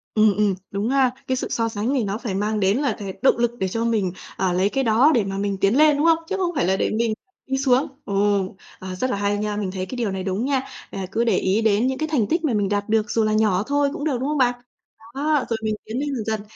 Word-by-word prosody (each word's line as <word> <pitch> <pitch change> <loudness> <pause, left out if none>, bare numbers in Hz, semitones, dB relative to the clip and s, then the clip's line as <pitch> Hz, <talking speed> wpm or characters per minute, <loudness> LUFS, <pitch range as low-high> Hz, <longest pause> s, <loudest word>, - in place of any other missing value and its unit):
Ừm, 215 -1 +5
ừm, 205 -3 +2 0.2
đúng 200 +3 -1
ha. 265 -2 +3 0.2
Cái 260 - +1
sự - - -3
so 230 -1 0
sánh 220 +5 -2
này 255 - +1
nó 200 +1 -2
phải 225 -5 -4
mang 210 +1 -1
đến 195 +3 +2
là 275 -5 0
th - - -9 0.2
động 265 - +4
lực 235 0 +1
để 190 - 0
cho 225 +5 -2
mình, 210 -6 +1 0.3
ờ, 185 -1 +1
lấy 185 +3 +2
cái 270 +3 0
đó 240 +7 +4
để 230 - +3
mà 195 0 -4
mình 200 -1 -1
tiến 200 +6 +3
lên, 300 -1 +5
đúng 300 - +1
không? 330 -1 +5
Chứ 390 - -1
không 360 -2 0
phải - - +1
là 190 - +3
để - - 0
mình 225 0 0 0.3
đi 265 0 0
xuống. 265 +1 +2 0.2
Ồ, 200 -1 +1 0.3
ờ, 185 0 -6
rất 255 +7 -1
là - - 0
hay 205 0 0
nha, 210 0 -2
mình 200 -3 -2
thấy 185 -1 -4
cái 255 - -7
điều 225 -5 -1
này 190 -1 -4
đúng 195 +6 -1
nha, 270 -2 +1 0.3
à, 195 -1 -4
cứ 230 +3 +1
để 235 - +2
ý 195 +4 +1
đến 220 +3 +2
những 260 0 -1
cái 315 - -2
thành 235 -9 +2
tích 330 - 0
mà 285 - +1
mình 205 -2 +1
đạt 205 0 -1
được, 215 -1 +1
dù 225 - +2
là 215 0 +1
nhỏ 210 -3 +2
thôi 285 0 +2
cũng - - -5
được, 290 -5 0
đúng 270 - -2
hông 300 - 0
bạn? 245 -2 +3 0.6
Đó, 295 0 +1
rồi 230 - 0
mình 215 -1 0
tiến 230 +4 -4
lên 290 0 -2
dần 225 -4 -4
dần. 220 -1 -1
220 Hz, 295 wpm, -22 LUFS, 200-265 Hz, 0.6 s, Ừm